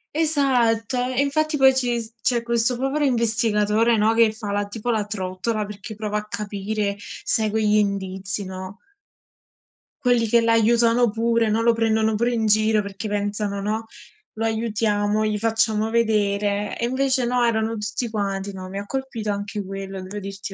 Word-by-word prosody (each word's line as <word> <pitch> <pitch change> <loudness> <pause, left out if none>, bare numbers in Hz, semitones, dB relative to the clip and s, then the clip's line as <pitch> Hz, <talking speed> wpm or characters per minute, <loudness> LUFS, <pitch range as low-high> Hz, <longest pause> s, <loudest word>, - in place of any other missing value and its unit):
Esatto, 260 -7 +2 0.2
e 260 - +3
infatti 310 +2 0
poi 265 -2 +6
ci 245 -2 0
s 225 0 -11
c'è 235 -1 +1
questo 235 +1 +1
povero 270 +4 0
investigatore, 230 -2 +2
no, 215 +1 +3
che 225 -1 +4
fa 215 -2 -6
la 205 0 -1
tipo 220 +3 -5
la 215 -2 0
trottola 200 +2 -3
perché 210 +2 -8
prova 210 0 -3
a 210 - -4
capire, 205 0 -3 0.3
segue 220 0 +1
gli 210 0 +3
indizi, 195 -1 -2
no? 185 +1 -7 1.3
Quelli 245 -2 +3
che 235 +2 +4
l'aiutano 230 +1 +3
pure, 230 0 +1
no, 220 +2 +1
lo 235 0 +4
prendono 220 -1 +1
pure 235 +3 +1
in 225 -2 0
giro 215 0 +3
perché 200 +1 -6
pensano, 205 0 -2
no: 215 +2 -2 0.5
"Lo 225 +1 -3
aiutiamo, 215 -2 0
gli 210 0 -1
facciamo 220 0 +1
vedere", 205 -2 +1
e 235 - 0
invece 260 0 +1
no, 245 0 +2
erano 225 -1 0
tutti 230 +3 -3
quanti 200 -2 -2
no, 185 -1 -8
mi 195 +2 -5
ha 200 - -6
colpito 265 -5 -4
anche 205 0 -3
quello, 195 0 -6
devo 190 +3 -7
dirti 195 0 -6
220 Hz, 165 wpm, -23 LUFS, 205-235 Hz, 1.3 s, poi